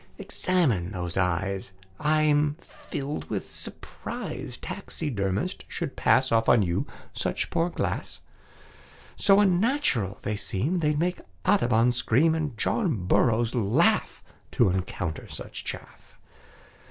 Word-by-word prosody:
"Examine 125 - 0
those 90 -2 -4
eyes. 95 +1 -1 0.3
I'm 150 -1 +3
filled 145 -3 -6
with - - -4
surprise - - -5
Taxidermists 100 - -3
should 170 -6 -4
pass 130 0 +3
Off 115 0 +3
on 120 -3 +6
you 85 -2 -1 0.3
such - - -2
poor 165 +2 +1
glass; - - -2 0.9
So 195 0 +5
unnatural 190 - +2
they 105 0 -1
seem 135 - -1
They'd 150 -2 +1
make 175 +3 0 0.2
Audubon 125 - +4
scream, 130 +6 +3
And 150 -7 -2
John 135 - 0
Burroughs 115 +3 +3
laugh 110 -4 +2 0.3
To - - +4
encounter 90 -3 -3
such - - -7
chaff. - - -8
125 Hz, 115 wpm, -27 LUFS, 100-165 Hz, 0.9 s, on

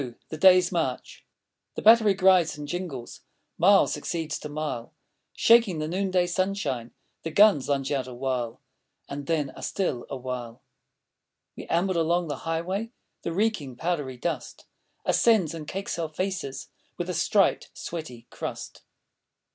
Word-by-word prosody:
THE 155 - -5
DAY'S 185 +1 +6
MARCH 160 -8 -3 0.5
The - - -5
battery 220 -2 +7
grides 185 -4 +4
and 145 -1 -7
jingles, 145 -7 -5 0.4
Mile 195 +4 +6
succeeds 165 -3 -3
to 150 - -7
mile; 145 -6 -4 0.4
Shaking 230 -7 +5
the 155 0 -2
noonday 185 +1 +1
sunshine, 175 - -1 0.3
The 165 - -4
guns 160 -5 +5
lunge 135 -1 0
out 135 -3 -1
awhile, 125 -2 -3 0.5
And 140 0 -6
then 150 -5 0
are - - -12
still 150 -11 -2
awhile. 125 -3 -6 0.9
We - - -9
amble 175 +1 +1
along 170 +1 +1
the 145 - -3
highway; 185 +7 -2 0.3
The - - -3
reeking, 170 - -1
powdery 145 -4 -2
dust 170 +7 -4 0.4
Ascends 210 -10 +3
and 155 -2 -7
cakes 195 -1 -4
our 165 -2 -2
faces 185 -4 -4 0.3
With 175 - -3
a 180 - -2
striped, 195 +4 +2
sweaty 140 -9 -7
crust. - - -6
165 Hz, 140 wpm, -26 LUFS, 140-185 Hz, 0.9 s, battery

